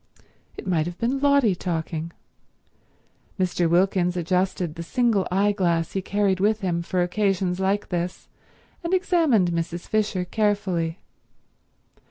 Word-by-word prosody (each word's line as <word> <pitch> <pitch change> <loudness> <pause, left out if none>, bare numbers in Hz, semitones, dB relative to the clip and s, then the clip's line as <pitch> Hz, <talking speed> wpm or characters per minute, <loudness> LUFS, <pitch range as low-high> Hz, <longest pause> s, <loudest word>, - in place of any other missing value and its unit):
It - - -8
might 170 -4 +1
have 175 0 -6
been 250 +4 0
Lotty 280 -6 +4
talking. 165 -2 -3 1.3
Mr. 180 -2 +1
Wilkins 180 0 +2
adjusted 180 -1 0
the 170 - -7
single 220 +1 +1
eyeglass 185 -4 +1
he 195 - -2
carried 195 0 0
with 215 +2 +2
him 175 -3 -1
for 180 +1 0
occasions 185 -1 0
like 195 +2 0
this, 175 0 -3 0.6
and 340 +2 +1
examined 320 - +2
Mrs. 170 +1 -3
Fisher 210 -4 0
carefully. 190 -5 0
185 Hz, 125 wpm, -24 LUFS, 175-205 Hz, 1.3 s, Lotty